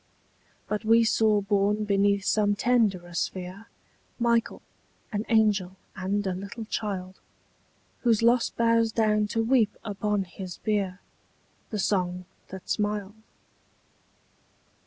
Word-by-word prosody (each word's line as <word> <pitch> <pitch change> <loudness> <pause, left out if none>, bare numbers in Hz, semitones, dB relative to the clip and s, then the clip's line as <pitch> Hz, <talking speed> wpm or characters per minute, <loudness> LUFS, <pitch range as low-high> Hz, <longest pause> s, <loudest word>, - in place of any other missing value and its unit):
But 210 +1 -2
we 225 +1 +5
saw 220 -2 +3
born 205 +1 +1
beneath 200 0 +2
some 205 -1 +2
tenderer 205 -7 +1
sphere 185 +5 -4 0.5
Michael, 235 -1 0 0.5
an 210 +2 -2
angel 210 -5 +2 0.2
and 195 +2 -2
a 190 - 0
little 200 +5 -7
child, 190 -4 -4 0.8
Whose 230 -2 +2
loss 240 +1 +4
bows 230 -1 +2
down 215 -2 +2
to 225 +2 -1
weep 230 -3 +2
upon 205 -1 -1
his 180 0 -8
bier 200 -3 -2 0.7
The 215 - -3
song 180 -2 -1 0.2
that 190 -1 -9
smiled. 205 -1 -1
205 Hz, 115 wpm, -27 LUFS, 195-225 Hz, 0.8 s, we